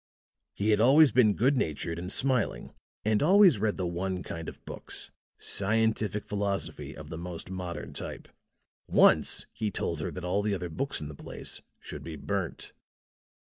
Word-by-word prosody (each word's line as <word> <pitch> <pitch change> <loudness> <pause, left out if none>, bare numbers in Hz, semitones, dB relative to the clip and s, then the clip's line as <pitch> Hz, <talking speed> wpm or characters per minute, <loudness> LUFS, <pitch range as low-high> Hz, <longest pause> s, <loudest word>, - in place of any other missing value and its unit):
He 105 +2 +1
had 105 - +3
always 135 +5 +7
been 110 -3 +4
good 135 +6 +3
natured 85 - -2
and 90 +2 -4
smiling 130 -3 0 0.3
and 110 -1 +2
always 185 - +6
read 105 0 0
the 95 - -2
one 90 +1 -3
kind 80 -1 -6
of - - -15
books - - -2 0.3
scientific 105 0 +1
philosophy 80 -8 -3
of 75 -1 -10
the 80 - -6
most 90 +1 -6
modern 90 -2 -5
type. - - -6 0.6
Once - - +4
he 110 -2 -2
told 85 -4 -3
her 75 - -3
that 90 -1 -7
all 95 +3 +1
the 105 -1 0
other 90 -2 -4
books 135 - -3
in 75 - -5
the 75 - -8
place - - -6 0.2
should - - -8
be 80 -1 -6
burnt." 95 +3 -4
100 Hz, 170 wpm, -29 LUFS, 85-110 Hz, 0.6 s, always